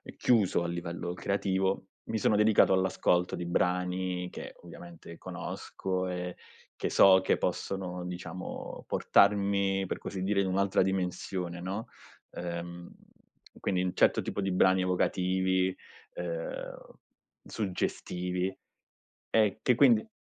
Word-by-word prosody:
chiuso, 105 -7 +3
a - - -2
livello 85 0 -4
creativo, 95 +1 -1 0.2
mi 110 - -2
sono 105 0 +2
dedicato 105 -2 +5
all'ascolto 95 -1 +2
di 85 - -4
brani 90 0 0
che, - - -8
ovviamente 85 -1 -11
conosco 95 -1 -4
e 90 0 -4 0.4
che - - -2
so 95 -1 +7
che - - +2
possono 90 -2 -3
diciamo 90 0 -7
portarmi 100 -1 +3
per - - -3
così 95 -2 -6
dire, 100 0 +1
in 95 - +2
un'altra 95 +1 +2
dimensione, 90 -1 -2
no, 100 +6 -4 0.4
uhm, 85 0 -6 0.7
quindi 90 -1 0
un 90 - -1
certo - - +4
tipo - - -4
di 95 -1 0
brani 95 0 +4
evocativi, 95 0 +1 0.4
uhm, - - -6 0.5
suggestivi 90 -2 -2 0.7
e 110 -2 +3
che 125 - +4
quindi 225 - +5
95 Hz, 120 wpm, -30 LUFS, 90-100 Hz, 0.7 s, so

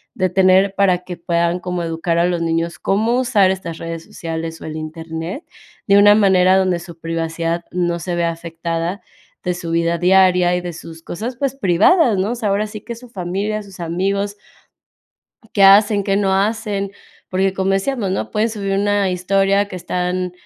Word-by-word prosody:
de 185 -1 +1
tener, 190 +1 +4
para 190 -3 +3
que 180 -1 -7
puedan 170 0 0
como 180 -1 -3
educar 165 +1 -2
a - - +3
los 175 -1 -1
niños, 165 0 -1
cómo 225 +5 +1
usar 210 -7 +3
estas 175 -4 -5
redes 165 0 -6
sociales 165 0 -6
o - - -8
el 155 0 -5
Internet, 160 - -6 0.4
de 200 - +5
una 205 0 +7
manera 190 -3 +4
donde 185 -2 +1
su 170 -1 -11
privacidad 165 +1 -3
no 175 -1 -1
se 175 +1 -3
vea 170 -1 +1
afectada, 165 +2 -4 0.4
de 180 - 0
su 170 -1 -6
vida 170 0 +1
diaria 180 0 +4
y - - -3
de 175 -1 -6
sus 165 0 -11
cosas, 235 +10 -5
pues, 275 -1 -1
privadas, 220 - +3
¿no?, 195 +4 0
o - - -2
sea, 225 -4 -2
ahora 205 +2 0
sí 210 0 -9
que 235 - -7
su 250 +2 -13
familia, 200 +2 -3
sus 195 -2 -14
amigos, 195 +4 -1 1.2
qué 200 - +4
hacen, 205 +1 +6
qué 195 0 +1
no 195 -1 +1
hacen, 200 -1 -1 0.4
porque 190 +1 +1
como 190 0 -1
decíamos, 195 0 -1
¿no?, - - -3
pueden 215 +1 +1
subir 195 -3 -2
una 205 -1 +1
historia 195 +2 +1
que 195 - -9
están 180 0 -2
185 Hz, 185 wpm, -19 LUFS, 170-200 Hz, 1.2 s, una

